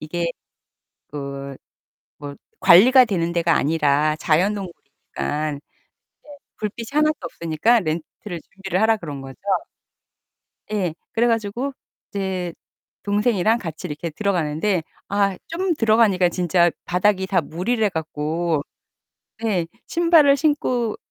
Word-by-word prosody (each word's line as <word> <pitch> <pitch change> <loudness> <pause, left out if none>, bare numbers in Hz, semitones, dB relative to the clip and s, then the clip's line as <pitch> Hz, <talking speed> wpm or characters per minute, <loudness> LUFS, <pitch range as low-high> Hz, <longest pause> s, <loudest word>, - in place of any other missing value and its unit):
이게 170 +2 -2 0.8
그 140 -1 -6 0.6
뭐 145 -1 -8 0.2
관리가 250 +9 +8
되는 170 -6 -1
데가 170 -2 +2
아니라 150 0 +2
자연동굴이니깐 155 -4 -2
이제 145 - -19 0.8
불빛이 215 +2 -5
하나도 305 +1 +3
없으니까 170 +9 +1
렌트를 170 +2 -5
준비를 195 +1 -4
하라 220 +1 +4
그런 150 -8 -7
거죠. 135 -1 -10 1.4
예. 185 -6 -1 0.2
그래 235 +1 +2
가지고 230 +4 -1 0.4
이제 190 -3 -3 0.5
동생이랑 210 +1 +2
같이 170 -3 -6
이렇게 160 +2 -5
들어가는데 175 0 0 0.3
아 200 -1 +1
좀 355 +2 -1
들어가니까 215 - +3
진짜 175 0 +2
바닥이 190 +1 +1
다 190 -3 +2
물이래 205 +9 -1
갖고 160 -1 -2 0.8
네. 190 -7 0 0.2
신발을 330 -5 +5
신고 255 -6 0
185 Hz, 260 characters per minute, -22 LUFS, 160-220 Hz, 1.4 s, 관리가